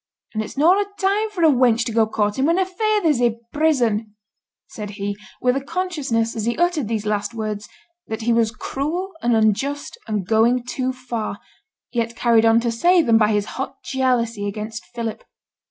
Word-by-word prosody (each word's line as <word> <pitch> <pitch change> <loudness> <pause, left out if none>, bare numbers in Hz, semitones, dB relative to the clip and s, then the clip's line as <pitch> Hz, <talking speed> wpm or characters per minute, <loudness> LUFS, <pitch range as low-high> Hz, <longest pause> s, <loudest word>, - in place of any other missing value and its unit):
And 215 -1 -1
it's 215 - -10
noane 345 +7 +5
a 405 0 -19
time 410 +3 +1
for 375 -5 -3
a 320 - +7
wench 245 -3 +3
to 235 - -2
go 225 -1 +3
courtin' 210 +3 0
when 335 +2 +3
her 380 - +2
feyther's 375 - +1
i' 235 -2 +2 0.2
prison,' 235 -9 +1 0.5
said 210 -2 -7
he, 200 0 -2 0.3
with 250 0 +2
a 275 - -2
consciousness 290 -10 -1
as 220 -2 -2
he 235 - -1
uttered 345 -7 +1
these 220 -1 -2
last 210 +1 -1
words 215 -2 -4 0.4
that 220 0 -4
he 235 +1 +2
was 230 -1 +3
cruel 305 - -3
and 240 -1 +2
unjust 225 +7 0
and 210 -4 -2
going 230 +4 +3
too 255 +1 -2
far, 245 -4 -4 0.5
yet 235 -1 -1
carried 230 -1 +4
on 225 +1 +5
to 235 0 0
say 345 +9 +4
them 230 -4 +4
by 215 0 +3
his 205 -1 +1 0.2
hot 270 0 -4
jealousy 235 -5 0
against 215 +2 -6
Philip. 230 -2 -5
235 Hz, 185 wpm, -21 LUFS, 220-290 Hz, 0.5 s, a